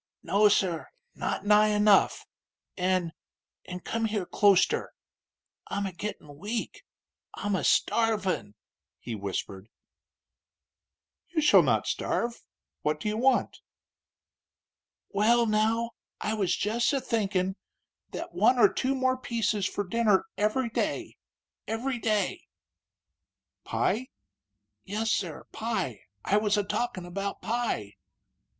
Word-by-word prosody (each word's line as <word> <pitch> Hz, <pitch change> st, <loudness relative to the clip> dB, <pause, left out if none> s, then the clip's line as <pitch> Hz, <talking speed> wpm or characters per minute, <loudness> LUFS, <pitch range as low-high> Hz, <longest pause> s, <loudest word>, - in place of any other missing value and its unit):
"No, 210 Hz, +1 st, +4 dB
sir; 185 Hz, -5 st, +1 dB, 0.3 s
not -, -, -3 dB
nigh 210 Hz, +1 st, +6 dB
enough. 210 Hz, -1 st, +4 dB, 0.5 s
An' 180 Hz, -3 st, 0 dB, 0.5 s
an' 180 Hz, 0 st, -7 dB
come 230 Hz, +4 st, -2 dB
here 210 Hz, -4 st, -1 dB
closter. 200 Hz, 0 st, +3 dB, 0.7 s
I'm 200 Hz, 0 st, -2 dB
a 190 Hz, -, -4 dB
gittin' 165 Hz, -6 st, -7 dB
weak 215 Hz, +5 st, -4 dB, 0.5 s
I'm 205 Hz, -1 st, -1 dB
a -, -, -1 dB
starvin'!" 205 Hz, -, +1 dB, 0.4 s
he 120 Hz, -, -6 dB
whispered. 100 Hz, 0 st, -5 dB, 1.6 s
"You 340 Hz, -, -1 dB
shall 300 Hz, -1 st, +7 dB
not -, -, +1 dB
starve. 235 Hz, 0 st, -2 dB, 0.4 s
What 150 Hz, 0 st, 0 dB
do 210 Hz, -, -2 dB
you 210 Hz, -, -2 dB
want?" 260 Hz, +3 st, +2 dB, 1.5 s
"Well, 230 Hz, +4 st, +3 dB
now, 225 Hz, +2 st, +1 dB, 0.3 s
I 215 Hz, -, -1 dB
was 200 Hz, -4 st, 0 dB
jess 235 Hz, +5 st, +1 dB
a 275 Hz, -, +2 dB
thinkin' 195 Hz, -6 st, 0 dB, 0.5 s
that -, -, -6 dB
one 255 Hz, -, +4 dB
or 240 Hz, -, +5 dB
two 270 Hz, +1 st, 0 dB
more 260 Hz, 0 st, +1 dB
pieces 220 Hz, -5 st, -1 dB
fur 205 Hz, -, -2 dB
dinner 210 Hz, 0 st, +2 dB
every 225 Hz, +4 st, 0 dB
day -, -, -2 dB, 0.5 s
every 240 Hz, +3 st, -2 dB
day 215 Hz, -2 st, -1 dB, 0.6 s
" -, -, -61 dB
"Pie?" 250 Hz, +4 st, 0 dB, 0.8 s
"Yes, 220 Hz, +3 st, -1 dB
sir; 170 Hz, -8 st, -2 dB
pie. 190 Hz, -, -3 dB, 0.2 s
I 205 Hz, -, +3 dB
was 210 Hz, 0 st, +2 dB
a 205 Hz, -, +2 dB
talkin' 200 Hz, -3 st, -2 dB
about 195 Hz, +3 st, -4 dB
pie." 220 Hz, -, -2 dB
210 Hz, 120 wpm, -28 LUFS, 185-230 Hz, 1.6 s, shall